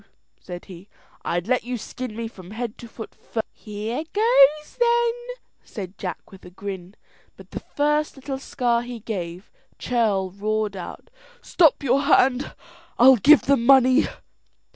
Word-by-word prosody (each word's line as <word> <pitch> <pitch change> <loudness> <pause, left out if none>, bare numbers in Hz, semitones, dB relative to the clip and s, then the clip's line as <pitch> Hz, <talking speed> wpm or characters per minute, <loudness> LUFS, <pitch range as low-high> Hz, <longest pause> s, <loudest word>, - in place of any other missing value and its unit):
said 175 -1 -9
he, 185 +1 -13 0.3
"I'd 175 +2 -2
let 250 0 +1
you 245 0 -4
skin 240 +1 -7
me 230 0 -4
from 185 -5 -13
head 230 +1 -5
to 235 - -9
foot 225 0 -10
first." 225 - -5
"Here 215 +6 -5
goes 305 - +4
then," 475 -1 +3 0.5
said 195 -3 -8
Jack 180 - -6
with 195 - -14
a - - -11
grin, 190 0 -8 0.4
but - - -15
the - - -5
first 300 +1 -1
little 270 0 -6
scar 240 -3 0
he 240 -1 -7
gave, 185 -4 -6 0.3
Churl 210 -6 0
roared 210 +1 -2
out, 175 -2 -9 0.3
"Stop 320 -4 +3
your 270 +1 +2
hand; 270 -2 +2 0.4
I'll 260 +1 +7
give 295 +8 +6
the 280 - +4
money." 260 +2 +5
235 Hz, 150 wpm, -23 LUFS, 200-270 Hz, 0.5 s, I'll